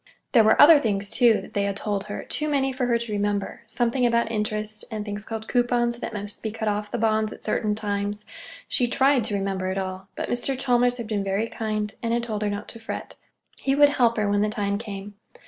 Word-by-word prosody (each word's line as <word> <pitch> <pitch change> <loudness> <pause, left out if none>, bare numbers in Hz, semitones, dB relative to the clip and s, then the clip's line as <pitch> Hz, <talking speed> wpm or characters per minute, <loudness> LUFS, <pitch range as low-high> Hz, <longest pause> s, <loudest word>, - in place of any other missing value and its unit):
There 230 -4 +6
were 215 - +4
other 305 0 +9
things, 200 -5 -1
too, 235 -4 +4
that - - -13
they 200 - +1
had 200 -1 -2
told 205 -2 -2
her—too 300 +8 -3
many 270 -2 +1
for 255 -1 -1
her 235 -1 +3
to 235 -1 -5
remember—something 220 +4 -1
about 235 -1 +2
interest, 215 0 -2
and 215 -2 -4
things 205 -1 -5
called 220 0 -6
coupons 240 -1 +1
that - - -4
must 205 -1 -4
be 220 - -2
cut 220 0 -4
off 210 0 -1
the 240 - -3
bonds 220 -1 +1
at - - -12
certain 210 -1 0
times. 205 0 -3 0.4
She 245 - +2
tried 265 +1 +3
to 210 - 0
remember 195 -1 -2
it 190 +1 -2
all; 190 0 -4
but - - -3
Mr. 250 +2 -1
Chalmers 245 -1 +2
had 235 - -5
been 210 -2 -2
very 195 +3 -1
kind 215 -2 -3
and 230 -1 -1
had 235 0 0
told 215 -3 -3
her 210 - 0
not 205 +1 -4
to 230 - -7
fret. 225 - -6 0.4
He 270 0 +1
would 290 0 +6
help 240 -5 +2
her 210 -1 +1
when 205 0 +2
the 210 - +2
time 200 -1 -1
came. 205 -2 -7
215 Hz, 230 wpm, -25 LUFS, 205-240 Hz, 0.4 s, other